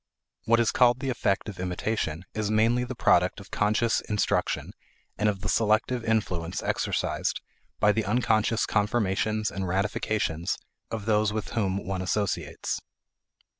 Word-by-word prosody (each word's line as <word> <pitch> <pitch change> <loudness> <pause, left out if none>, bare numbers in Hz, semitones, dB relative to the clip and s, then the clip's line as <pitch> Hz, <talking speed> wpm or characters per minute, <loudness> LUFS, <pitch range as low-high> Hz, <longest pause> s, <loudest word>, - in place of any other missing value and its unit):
What 115 +1 +4
is 115 -2 +3
called 125 0 +4
the 135 -1 -1
effect 100 -5 0
of 100 -4 -7
imitation 90 -2 -2
is 110 -1 -1
mainly 115 +3 +3
the 125 +1 -5
product 95 -6 +3
of 100 - -13
conscious 110 +3 +2
instruction 105 -1 0 0.4
and 105 +1 +2
of 100 -2 -3
the - - -3
selective 110 +2 +2
influence 95 -6 -1
exercised - - -1 0.4
by 105 - +5
the 110 0 0
unconscious 110 0 +2
confirmations 110 0 0
and 95 -1 -3
ratifications 95 -2 -1 0.3
of 110 -3 -4
those 105 -1 +2
with 110 0 -3
whom 100 -4 -1
one 95 -1 -2
associates. 100 +1 -2
105 Hz, 140 wpm, -27 LUFS, 95-115 Hz, 0.4 s, by